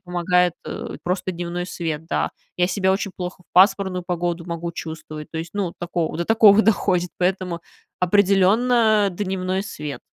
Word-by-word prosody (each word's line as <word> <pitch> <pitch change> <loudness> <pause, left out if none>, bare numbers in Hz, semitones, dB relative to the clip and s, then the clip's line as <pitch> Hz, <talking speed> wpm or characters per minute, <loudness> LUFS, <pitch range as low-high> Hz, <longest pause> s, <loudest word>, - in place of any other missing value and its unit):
помогает, 180 -1 +1
э, - - -6
просто 180 +1 -1
дневной 175 0 -4
свет, 160 -4 -4
да. - - -1 0.3
Я 180 - +3
себя 190 0 +1
очень 195 0 -1
плохо 180 0 -6
в - - -46
пасмурную 190 0 +4
погоду 175 -1 -2
могу 170 0 -4
чувствовать, 155 -2 -7
то 160 - -5
есть, 165 +1 -5
ну, 195 -4 -2
такого 175 -2 -2
до 170 - -1
такого 220 0 +6
доходит, 180 -5 +1
поэтому 180 -1 -1 0.4
определенно 205 +4 +4
дневной 190 0 -2
свет. 150 -7 -6
180 Hz, 155 wpm, -22 LUFS, 170-195 Hz, 0.4 s, такого